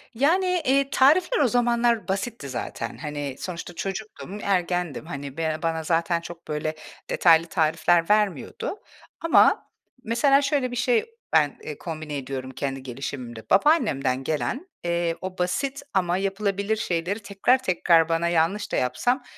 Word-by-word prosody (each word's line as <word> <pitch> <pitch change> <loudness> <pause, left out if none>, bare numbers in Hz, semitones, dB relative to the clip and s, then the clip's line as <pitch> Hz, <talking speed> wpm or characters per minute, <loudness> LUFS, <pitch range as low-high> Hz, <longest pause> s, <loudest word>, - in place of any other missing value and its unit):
Yani, 360 +7 +2
eee, 275 +1 +3
tarifler 340 - +4
o 275 - +4
zamanlar 235 -2 +2
basitti 195 - -3
zaten, 120 -1 -5
hani, 145 0 -5
sonuçta 175 -2 -6
çocuktum, 195 -2 -6
ergendim, 180 -6 -1
hani, 140 -3 -7
ben 155 -1 -1
bana 165 -1 -1
zaten 170 +1 +1
çok, 170 0 -10
böyle, 155 +1 -2 0.3
detaylı 165 -1 +5
tarifler 165 +1 +2
vermiyordu 210 - 0 0.4
ama 330 - +4 0.4
mesela 275 +5 +3
şöyle 275 -3 0
bir - - -4
şey 450 - +2 0.3
ben, 150 -3 +3
eee, 150 - -6
kombine 155 -3 -5
ediyorum 130 -1 -5
kendi 135 0 -4
gelişimimde. 125 -3 -7
Babaannemden 190 - +3
gelen, 250 - -2 0.2
eee, 170 -1 0
o 185 0 -6
basit 270 +10 -1
ama 180 -2 +1
yapılabilir 200 +1 -1
şeyleri 180 0 -2
tekrar 220 +6 +1
tekrar 170 -2 +3
bana 165 +1 +1
yanlış 175 +5 +1
da - - 0
yapsam, 245 - 0
175 Hz, 140 wpm, -25 LUFS, 155-235 Hz, 0.4 s, detaylı